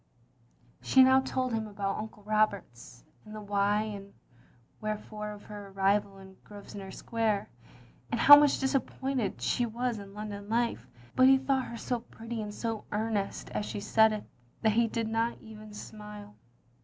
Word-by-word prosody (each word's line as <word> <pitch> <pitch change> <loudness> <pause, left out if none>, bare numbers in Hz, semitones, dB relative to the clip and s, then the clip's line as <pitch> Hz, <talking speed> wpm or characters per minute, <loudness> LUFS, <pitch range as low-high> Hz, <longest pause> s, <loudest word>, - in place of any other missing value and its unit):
" - - -36 0.3
She 265 - +6
now 260 0 +6
told 260 -2 -2
him 220 -1 -1
about 200 -1 -3
Uncle 215 -1 -8
Roberts, 200 - -1 0.2
and 215 0 -10
the - - -6
why 205 +1 +1
and 200 -2 -8 0.7
wherefore 215 0 -4
of 205 -1 -10
her 205 -1 -9
arrival 195 +1 +1
in 190 0 -14
Grosve 205 -1 -12
nor 195 -1 -7
Square, 220 0 -1 0.6
and - - 0
how 290 - +12
much 290 -1 +5
disappointed 265 -3 -1
she 245 -1 +1
was 235 0 -2
in 200 0 -11
London 205 -1 -6
life, 230 - 0 0.3
but 255 - +6
he 265 0 +7
thought 265 -1 0
her 235 - -7
so 245 +1 -2
pretty 230 0 -7
and 210 -1 -5
so 225 -2 -3
earnest 210 -2 -2
as - - -2
she - - -4
said 220 +2 +4
it 215 -1 -3 0.4
that 220 - +4
he 230 +2 +3
did 225 0 -2
not 225 +1 0
even 215 -1 -12
smile. 210 0 -10
215 Hz, 170 wpm, -30 LUFS, 205-230 Hz, 0.7 s, how